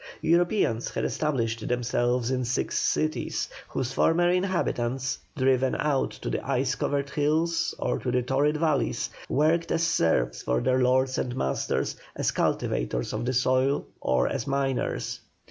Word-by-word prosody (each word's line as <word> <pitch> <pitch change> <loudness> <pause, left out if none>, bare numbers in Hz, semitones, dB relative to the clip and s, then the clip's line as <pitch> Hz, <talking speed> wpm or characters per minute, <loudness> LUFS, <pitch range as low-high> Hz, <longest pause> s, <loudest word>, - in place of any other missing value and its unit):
Europeans 170 - +2
had - - -2
established 115 -7 -1
themselves 120 0 0
in 130 -1 0
six 120 +1 -1
cities, 155 0 0 0.2
whose 130 0 -3
former 175 +4 +3
inhabitants, 140 -8 -1 0.2
driven 130 -1 +2
out 145 -3 +1
to - - -9
the - - -2
ice - - 0
covered 140 -1 -1
hills 160 +4 +1
or - - -1
to 130 - -3
the 125 0 +1
torrid 140 +4 +1
valleys, 155 -3 0 0.2
worked 160 +4 +2
as 165 - +1
serfs 80 - +1
for 65 0 0
their 130 - +2
lords 130 +1 +2
and 125 -1 -2
masters 65 - -1 0.2
as - - 0
cultivators - - -1
of 110 +2 -2
the 130 - 0
soil 130 +2 +2
or 65 -1 +1
as 135 -2 -3
miners. 135 -1 -1
130 Hz, 145 wpm, -27 LUFS, 120-150 Hz, 0.2 s, former